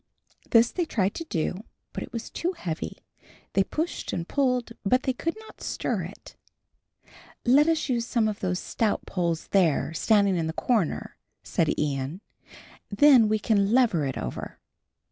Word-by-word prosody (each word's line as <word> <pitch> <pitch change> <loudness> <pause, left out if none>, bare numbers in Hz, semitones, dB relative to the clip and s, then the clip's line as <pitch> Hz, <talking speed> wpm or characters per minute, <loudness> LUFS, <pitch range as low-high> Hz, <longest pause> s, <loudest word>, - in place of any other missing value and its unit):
This 230 0 +5
they 350 - -1
tried 200 -9 0
to 330 - -6
do, 180 - -2 0.3
but - - -4
it - - -7
was 230 -1 -6
too 355 +3 -2
heavy. 160 - -5 0.6
They 195 - +4
pushed 320 - -3
and 170 -1 -3
pulled, 250 -4 0
but 255 +6 +2
they 260 - 0
could 330 +6 -3
not 440 - -15
stir - - -2
it. - - -12 1.1
"Let 280 +5 +5
us 325 -3 +1
use 240 -3 -1
some 230 -3 +1
of 210 -1 -3
those 180 -1 -1
stout 215 +3 -1
poles 170 -3 -2
there, 165 -5 +2
standing 200 +1 +3
in 165 -1 -1
the 160 - -3
corner," 215 -4 -1 0.3
said - - 0
Ian; 145 +4 -2 0.7
"then 235 0 +6
we 215 - +2
can 205 -1 +1
lever 235 - +3
it 130 - -4
over." - - -5
215 Hz, 165 wpm, -26 LUFS, 180-255 Hz, 1.1 s, then